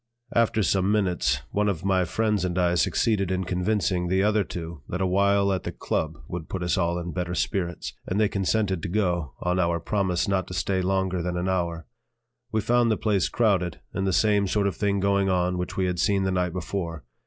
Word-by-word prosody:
After 115 -2 +2
some 95 +1 +2
minutes 90 -10 +1
one 105 0 +1
of 90 -3 -3
my 95 -2 +2
friends 105 +3 0
and 90 -1 -1
I 90 -1 +3
succeeded 100 +2 +1
in 95 0 0
convincing 90 0 0
the 95 +2 +2
other 105 0 +3
two 85 -4 -7
that 90 - -3
a 95 - +1
while 100 +1 +3
at 95 - -1
the - - -4
"Club" 80 0 -2
would 85 -3 -6
put 95 -2 -3
us 85 - +1
all 85 -2 0
in 85 0 -4
better 90 +2 -3
spirits; 85 -3 -2
and 95 - -1
they 110 - +4
consented 100 -2 0
to - - -4
go, 85 -8 -1
on 90 +1 0
our 85 -1 +1
promise 90 -2 0
not 95 -2 0
to 90 - -6
stay 95 -1 0
longer 95 -1 0
than 90 +1 -2
an 90 +1 -1
hour. 85 -3 -1 0.7
We 110 - +1
found 120 +2 +3
the 110 - +2
place 100 -5 +1
crowded, 95 -7 +1
and 95 0 -1
the - - +2
same 100 +2 +3
sort 100 +1 +1
of 100 - 0
thing 100 -1 0
going 100 0 +2
on 90 -1 +1
which 90 - -4
we 95 - +2
had 90 -1 -1
seen 100 0 +2
the 95 - 0
night 90 -1 0
before. 85 -3 -4
95 Hz, 220 wpm, -25 LUFS, 90-100 Hz, 0.7 s, they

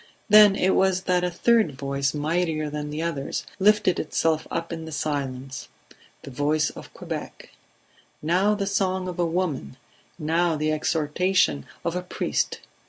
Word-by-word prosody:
Then 210 -1 +8
it 190 -1 +2
was 190 -1 +2
that 180 -1 +1
a 180 - +1
third 215 -1 +2
voice, 140 0 -1
mightier 155 0 -1
than 150 0 -4
the 150 +2 -3
others, 150 -5 -3
lifted 210 -2 +3
itself 160 0 0
up 165 0 -3
in 165 -1 -6
the 160 - -8
silence: 135 -3 -4 0.6
the 140 - -9
voice 150 +3 +1
of - - -11
Quebec - - -7 0.7
now 185 +7 +2
the 200 -1 -2
song 190 -2 0
of 180 -1 -6
a 175 - +3
woman, 165 - -2 0.4
now 165 +2 +1
the 155 0 0
exhortation 155 - +1 0.2
of 170 0 -1
a 180 - -1
priest. 180 - -2
165 Hz, 155 wpm, -25 LUFS, 150-185 Hz, 0.7 s, Then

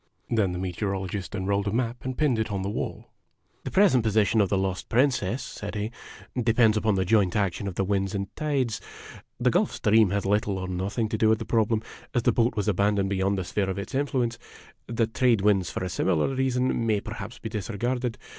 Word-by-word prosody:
Then 105 -5 +2
the 90 - -4
Meteorologist 95 +1 -3
unrolled 100 +1 0
a - - 0
map 120 +1 -2
and 130 -1 -4
pinned 140 -7 +2
it 110 -1 -1
on 100 -2 -2
the 100 - -2
wall. - - -5 0.2
" - - -42
The - - -2
present 180 - +4
position 110 0 +3
of 100 - +1
the 100 - +1
lost 95 -1 -2
Princess," 125 -2 +1
said 105 -2 -7
he, 105 +2 -2 0.4
"depends 115 -2 +3
upon 105 -1 +2
the 95 0 +1
joint 100 -2 +3
action 100 0 0
of 95 - -4
the 95 - +1
winds 95 0 0
and 100 0 -4
tides. 140 -7 -1 0.6
The - - +3
Gulf - - +2
Stream 110 -1 +3
has 100 +1 -1
little 100 0 +1
or 95 0 -4
nothing 95 +5 -2
to 110 -2 -2
do 110 - +4
with 110 - +4
the 115 - -6
problem, 110 -1 +1 0.3
as 120 - +2
the - - +4
boat 120 +1 +1
was 105 0 -1
abandoned 100 0 +1
beyond 100 +1 +1
the 95 - -1
sphere 95 +2 -1
of 95 - -3
its 100 - -6
influence. 130 -4 0 0.5
The 115 -1 +1
trade 115 -1 +2
winds 100 -3 +3
for - - -4
a - - -1
similar 90 -3 +1
reason 130 -2 0
may 105 -2 +2
perhaps 105 +2 -7
be 110 - -6
disregarded. 115 +4 -2
105 Hz, 215 wpm, -26 LUFS, 95-115 Hz, 0.6 s, present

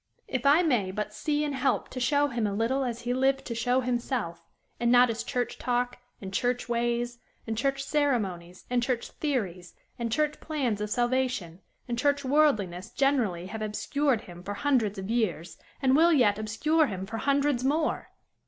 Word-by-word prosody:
If 260 0 -1
I 300 +5 +6
may 245 - +1
but 210 +2 -4
see 300 +4 -1
and 295 -1 -2
help 265 0 0
to 255 - -6
show 285 +3 +2
him 235 -4 -1
a 200 - -2
little 245 +6 +1
as 240 -2 -3
he 245 +1 -1
lived 270 +1 +1
to 235 - -4
show 245 +3 +1
himself, 240 -8 -2 0.4
and 240 0 +2
not 245 -1 +6
as 230 - -3
church 245 -1 -3
talk 245 0 -1 0.2
and 190 -1 -8
church 245 +4 0
ways 240 0 -1 0.3
and 225 - -3
church 275 +3 0
ceremonies 210 - -1
and 245 0 +1
church 240 -1 -2
theories 195 - -3 0.2
and 235 -1 -2
church 300 +3 0
plans 260 -10 -1
of 210 - -2
salvation 240 -7 -1 0.3
and 235 -1 -2
church 285 +1 +1
worldliness 220 - +2
generally 240 -11 +1
have 215 +4 -6
obscured 245 +4 0
him 175 -1 -11
for 205 +3 -5
hundreds 230 -6 +1
of 190 +3 -4
years, 180 -8 -1 0.2
and 260 0 +4
will 335 +3 +6
yet 215 -9 +4
obscure 300 +9 +2
him 190 -3 -4
for 225 +3 -5
hundreds 280 0 +1
more! 305 +4 0
245 Hz, 180 wpm, -28 LUFS, 210-275 Hz, 0.4 s, I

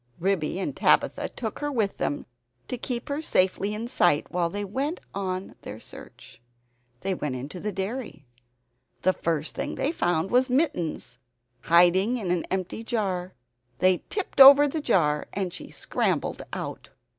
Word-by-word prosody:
Ribby 180 -3 0
and 230 +8 -3
Tabitha - - +2
took 220 -3 -5
her 290 0 -2
with 220 -7 0
them 145 - -2 0.4
to - - -2
keep 245 0 -4
her 285 +2 -2
safely 195 -5 +1
in 225 +2 -4
sight, 175 - +2
while 175 -1 0
they 205 +3 -4
went 275 - -2
on 185 -1 -3
with - - -20
their 105 - -8
search. - - -13 0.6
They 195 0 -1
went 150 -7 -3
into 140 +8 -6
the 210 +4 -3
dairy. 195 - -5 0.8
The 185 - +4
first 160 -3 -2
thing - - -4
they 285 - 0
found 175 - 0
was 255 +2 +3
Mittens, 250 - -1 0.5
hiding 180 +7 +4
in 195 -7 -2
an 180 -2 0
empty 190 +4 -3
jar. 190 -6 -2 0.4
They 185 +3 +4
tipped 395 -8 0
over 280 +2 +10
the 310 +2 -3
jar, 155 - +2
and 190 -3 -2
she - - -8
scrambled - - -1
out. - - -6
195 Hz, 160 wpm, -26 LUFS, 175-245 Hz, 0.8 s, over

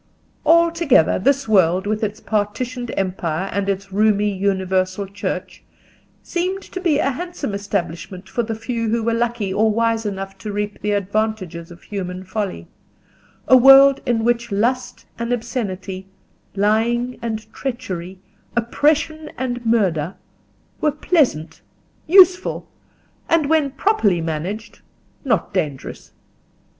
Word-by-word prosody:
Altogether 335 - +4
this 275 +6 +1
world, 185 -3 +3
with 215 +1 -1
its 215 0 -2
partitioned 230 +3 -2
empire 185 -1 -2
and 200 0 -1
its 195 0 -3
roomy 205 0 +2
universal 190 0 0
Church, 200 +1 -5 0.6
seemed 370 +3 -2
to 370 - -7
be 330 -6 +2
a 275 - +1
handsome 335 - -5
establishment 190 -2 -4
for 240 - -1
the 225 -1 -3
few 230 0 -3
who 230 +1 0
were 230 +1 +1
lucky 230 -4 -1
or 220 +2 +3
wise 230 +1 +1
enough 195 -2 -5
to 210 +2 -5
reap 205 0 -4
the 210 - -2
advantages 200 -4 -2
of 175 0 -14
human 185 -2 -5
folly: 190 - -4 0.8
a 260 - +7
world 270 +2 +8
in 235 -3 0
which 235 -1 0
lust 245 +4 -1
and 235 +1 -2
obscenity, 195 -6 -4 0.5
lying 230 +5 +1
and 220 -2 -5
treachery, 190 -9 -5 0.4
oppression 300 +6 +1
and 245 -2 -3
murder, 185 -7 +1 0.6
were 305 - +2
pleasant, 285 - 0 0.5
useful, 365 +1 +5 0.6
and 325 -3 +3
when 310 -3 +3
properly 265 - +1
managed, 165 +8 -4 0.4
not 225 - 0
dangerous. 150 -8 -4
215 Hz, 125 wpm, -20 LUFS, 190-250 Hz, 0.8 s, world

